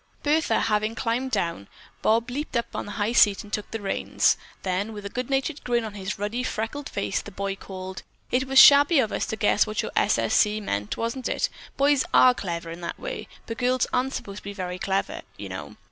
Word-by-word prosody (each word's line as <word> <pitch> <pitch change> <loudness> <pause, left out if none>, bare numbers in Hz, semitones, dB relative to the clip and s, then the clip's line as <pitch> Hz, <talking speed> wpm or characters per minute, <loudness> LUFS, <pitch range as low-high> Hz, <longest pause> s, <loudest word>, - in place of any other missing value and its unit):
Bertha, 300 -6 +2
having 215 0 0
climbed 245 +3 -1
down, 170 - -2 0.3
Bob 230 +3 +2
leaped 285 -1 -2
up 235 - 0
on - - -4
the 205 - -6
high 210 +1 0
seat 205 -4 +5
and 210 - -15
took 210 - -2
the 225 - -4
reins, 200 -2 +1 0.3
then 195 +4 -1
with 205 -1 -8
a - - -3
good 250 0 -4
natured 275 +2 -1
grin 240 -1 +1
on 215 -2 -6
his 195 0 -4
ruddy, 210 +5 -2
freckled 255 +4 -3
face, 200 0 -2
the - - -10
boy 200 0 -3
called: 190 -1 -8 0.3
"It 260 +1 +1
was 270 0 0
shabby 285 +4 +9
of 230 -5 +2
us - - -1
to - - -2
guess 215 0 +3
what 215 - -2
your - - -4
S. - - +3
S. - - 0
C. 210 0 +3
meant, 105 - -3
wasn't 230 +3 -2
it? - - 0 0.3
Boys 280 0 +4
are 255 - +7
clever 170 -6 -5
that 170 0 -6
way, - - -5 0.2
but 230 - -6
girls 255 0 +2
aren't 260 +2 +1
supposed 200 0 -6
to - - -10
be 200 - -6
very 185 -2 -5
clever, 195 +1 -1 0.2
you - - -7
know. - - -7
220 Hz, 220 wpm, -25 LUFS, 200-255 Hz, 0.3 s, shabby